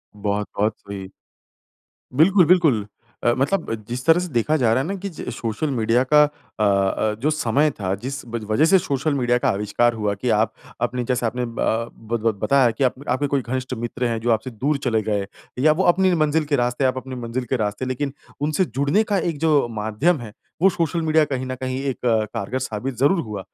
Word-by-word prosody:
बहुत, 105 0 -2
बहुत 105 +1 +2
सही। 100 -1 -8 1.1
बिल्कुल, 180 +2 +5
बिल्कुल 155 - +3 0.4
अ, 120 - +5
मतलब 140 0 0 0.2
जिस 125 +1 -4
तरह 165 +2 +6
से 180 - -4
देखा 120 +7 +2
जा 120 -6 +2
रहा 130 +3 +2
है - - -4
ना 195 - -2
कि 200 - -2
ज 170 - -8
सोशल 115 +6 -3
मीडिया 115 +1 +2
का 150 0 +8
अ 145 -7 -5
अ, 100 +2 +1
जो 150 +4 +2
समय 150 +1 +2
था 95 0 0
जिस 135 +2 -5
व 115 0 -4
वजह 125 +8 +3
से 190 +4 +6
सोशल 145 -2 -1
मीडिया 125 -2 +2
का - - 0
आविष्कार 105 +4 +1
हुआ 105 -2 -1
कि 110 +5 -4
आप 110 +1 +2 0.3
अपने 120 0 -1
जैसे 125 -1 0
आपने 125 +2 -2
अ, - - -1
बत 115 0 -2
बत 115 -1 +1
बताया 135 -3 +4
कि 120 +5 -1
आप 125 - +2
आपके 130 +3 +1
कोई 140 -1 0
घनिष्ठ 130 +1 -3
मित्र 120 +2 -4
हैं, 115 -1 -2
जो 120 +1 0
आपसे 110 +3 0
दूर 140 +6 -1
चले 115 -3 +1
गए 100 -2 -1 0.3
या 155 +3 +5
वो 185 +5 0
अपनी 190 0 +2
मंजिल 155 -1 +2
के 145 -1 0
रास्ते 120 +2 0
आप 130 0 +2
अपनी 130 0 -6
मंजिल 120 +2 -3
के 130 - +2
रास्ते 105 +3 -2
लेकिन 130 +2 -2 0.3
उनसे 155 +5 +1
जुड़ने 140 - +1
का 205 -2 0
एक 165 -4 -2
जो 150 -4 +3
माध्यम 110 +9 0
है 110 -3 -8 0.3
वो 195 - +7
सोशल 170 -1 -1
मीडिया 155 -1 +3
कहीं 130 -2 -3
न 130 - -3
कहीं 130 0 -2
एक 135 -2 -1
कारगर 110 +1 0
साबित 125 +1 -4
ज़रूर 145 +7 +3
हुआ। 105 -6 -5
125 Hz, 215 wpm, -22 LUFS, 110-150 Hz, 1.1 s, का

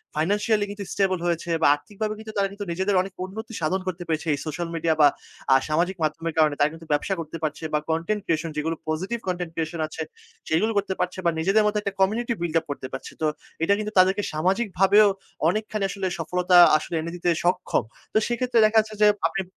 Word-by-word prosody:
financially 205 +6 +1
কিন্তু 205 0 -6
stable 190 -2 +1
হয়েছে 170 0 -1
বা - - +5
আর্থিকভাবে 210 +7 -5
কিন্তু 220 0 -8
তারা 195 - +2
কিন্তু 205 0 -6
নিজেদের 190 +3 0
অনেক 190 0 -6
উন্নতি 220 +4 -8
সাধন 185 +4 0
করতে 180 -1 -3
পেরেছে 160 0 -2
এই 145 - -2
সোশ্যাল 165 +3 -3
মিডিয়া 165 0 +1
বা 145 - +9 0.5
আ - - +7
সামাজিক 175 +5 +1
মাধ্যমের 160 +2 -2
কারণে 155 -2 +4
তারা 145 +1 +4
কিন্তু 165 0 -11 0.4
করতে 165 +1 -7
পারছে 155 +1 -3
বা 150 - +3
content 170 +6 -1
creation 165 -2 -1
যেগুলো 160 +2 -1
positive 190 +9 -2
content 175 -2 -2
creation 160 0 -3
আছে, - - -7 0.5
সেগুলো 195 +8 +2
করতে 195 -1 0
পারছে 180 +1 -2
বা 170 - +4
নিজেদের 195 +6 +3
মধ্যে 210 0 +1
একটা 200 -1 -3
community 225 +5 +1
buil 170 -2 -2
up 160 - -16
করতে 130 -2 -5
পারছে। 130 - -6
তো 155 - +2 0.4
এটা 200 - +4
কিন্তু 215 0 -3
তাদেরকে 190 +2 +4
সামাজিকভাবেও 195 +4 +3 0.4
অনেকখানি 215 +1 -2
আসলে 195 -1 -3
সফলতা 180 +2 +2 0.2
আসলে 165 +2 -5
এনে 170 - -5
দিতে 175 0 -1
সক্ষম। 180 +1 +1 0.3
তো - - +3
সেক্ষেত্রে 240 0 +1
দেখা 220 +1 +3
যাচ্ছে 215 0 -2
যে 210 - +7 0.2
আপনি 190 +4 -3
185 Hz, 200 wpm, -24 LUFS, 165-210 Hz, 0.5 s, বা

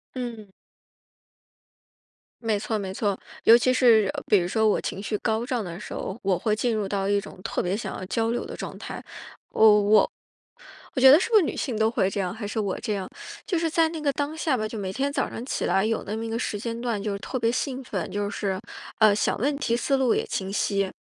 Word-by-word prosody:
嗯。 230 -5 -6 1.9
没 220 -2 +1
错 220 +1 -2
没 190 -2 -4
错， 200 0 -1 0.3
尤 230 - +9
其 255 +2 +3
是 225 -6 +5
比 210 - +5
如 175 - -1
说 220 +3 +2
我 210 - +2
情 195 - -4
绪 210 +1 -2
高 220 +1 0
涨 245 -4 -1
的 175 0 -7
时 - - -8
候， 195 - -5
我 190 -2 +1
会 215 -1 +1
进 235 +1 0
入 210 -2 -1
到 195 0 -1
一 200 0 +2
种 - - -12
特 - - -1
别 185 +3 -1
想 - - -5
要 - - -6
交 225 +3 0
流 240 - -1
的 - - -7
状 - - -6
态。 - - -7 0.5
我 210 -1 +6
我 210 +1 +4 0.8
我 - - 0
觉 265 - +10
得 300 - +8
是 - - -1
不 450 - +2
是 405 - +7
女 - - -2
性 245 -6 -2
都 220 0 +3
会 190 -5 +1
这 200 - -4
样， 180 -2 -1
还 220 -2 -6
是 215 +2 -3
我 200 -3 -1
这 215 -4 -2
样， 190 -1 -4 0.4
就 360 -6 0
是 330 -1 0
在 325 0 +3
那 320 -1 -6
个 285 - +2
当 290 +3 -2
下 305 -5 0
吧， 215 0 -2
就 220 - -8
每 190 -1 -3
天 280 +5 -1
早 275 - 0
上 240 - -6
起 - - -2
来 195 +2 +2
有 225 0 -1
那 210 +2 -3
么 225 - -4
一 225 - -4
个 230 - -2
时 205 -4 -2
间 230 +1 -4
段 230 -5 -1
就 200 -1 -2
特 255 - -4
别 230 0 +2
兴 260 +1 -2
奋， 190 -8 -4
就 205 0 -1
是， 195 -3 -2 0.4
呃， 215 -2 +6
想 - - 0
问 280 +5 +1
题 235 -5 0
思 275 +2 +1
路 260 -3 +2
也 - - 0
清 190 0 -3
晰。 200 -1 0
220 Hz, 265 characters per minute, -25 LUFS, 200-250 Hz, 1.9 s, 觉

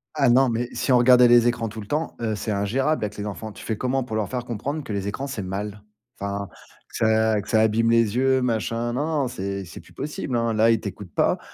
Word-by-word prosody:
Ah 135 -3 +3
non, 130 +2 +5
mais 120 +1 -2
si - - 0
on 125 - +6
regardait 125 0 +7
les 120 0 +6
écrans 120 -2 0
tout 110 +1 -8
le 105 - -10
temps, 155 +2 -2
heu, 110 -2 -1
c'est 105 +1 -3
ingérable 115 +8 0
avec 105 0 -4
les 105 - -4
enfants. 105 +1 -6
Tu - - -11
fais 110 - -2
comment 130 +2 0
pour 110 -3 -5
leur 110 -2 -1
faire 125 -1 -4
comprendre 140 +7 -4
que 110 - -6
les 100 -1 -2
écrans, 130 +7 -3
c'est 135 -6 -4
mal? 100 +2 -5 0.4
Enfin, 100 -1 -4 0.4
que - - -14
ça 110 -1 +2
que 100 - -13
ça 110 - +4
abîme 110 +1 +2
les 115 -1 +3
yeux, 130 +1 +3
machin? 115 0 -1
Non, 140 +4 -1
non, 160 -2 0
non, - - -1
c'est 100 -5 -4
c'est 85 - -10
plus - - -17
possible, 140 -4 -3
hein. 115 -1 0
Là, 110 +1 +4
ils 115 -2 +3
t'écoutent 100 -3 -7
pas, - - +1
115 Hz, 260 wpm, -24 LUFS, 105-125 Hz, 0.4 s, regardait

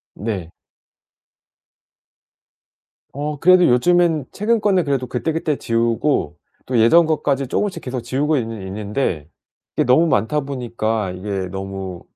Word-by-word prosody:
네. 100 -6 -4 2.6
어 145 +1 -4
그래도 180 +1 +6
요즘엔 165 +3 +3
최근 225 +3 +1
거는 190 -4 +2
그래도 135 -3 -1
그때그때 155 +4 -1
지우고 115 - 0 0.3
또 125 -2 0
예전 155 +10 +6
것까지 140 -3 0
쪼금씩 200 +9 -2
계속 125 -1 -4
지우고 140 +6 0
있는 115 -6 -4
있는데 100 - -3 0.5
이게 - - +2
너무 130 +7 +4
많다 140 +1 +1
보니까 115 -6 -2
이게 95 +1 -4
너무 95 -1 -6
125 Hz, 265 characters per minute, -20 LUFS, 105-150 Hz, 2.6 s, 그래도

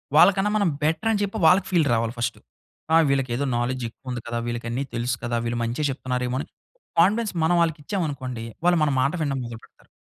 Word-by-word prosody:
వాళ్ళకన్నా 195 +5 +6
మనం 200 -4 +2
బెటరని 205 +8 +1
చెప్పి 200 +2 -3
వాళ్ళకి 185 +4 +5
ఫీల్ 165 -5 +3
రావాలి 115 0 0
ఫస్టు. 120 0 -2 0.6
ఆ! - - +8
వీళ్ళకేదో 135 0 0
నాలెడ్జ్ 125 +1 -1
ఎక్కువుంది 125 0 -7
కదా! 120 0 -2
వీళ్ళకన్ని 120 +2 -3
తెలుసు 120 +1 0
కదా! 120 0 -1
వీళ్ళు 120 0 -2
మంచే 120 +6 -2
చెప్తున్నారేమో! 125 -1 -2
అని - - -5 0.5
కాన్ఫిడెన్స్ 210 +4 +3
మనం 175 +1 +3
ఆళ్ళకిచ్చాం 165 +4 -2
అనుకోండి, 125 -4 -5 0.2
వాళ్ళు 175 -1 +4
మన 150 - +3
మాట 140 - +2
వినడం 140 -3 -1
మొదలు 115 -1 -7
పెడతారు. - - -22
135 Hz, 180 wpm, -24 LUFS, 120-170 Hz, 0.6 s, ఆ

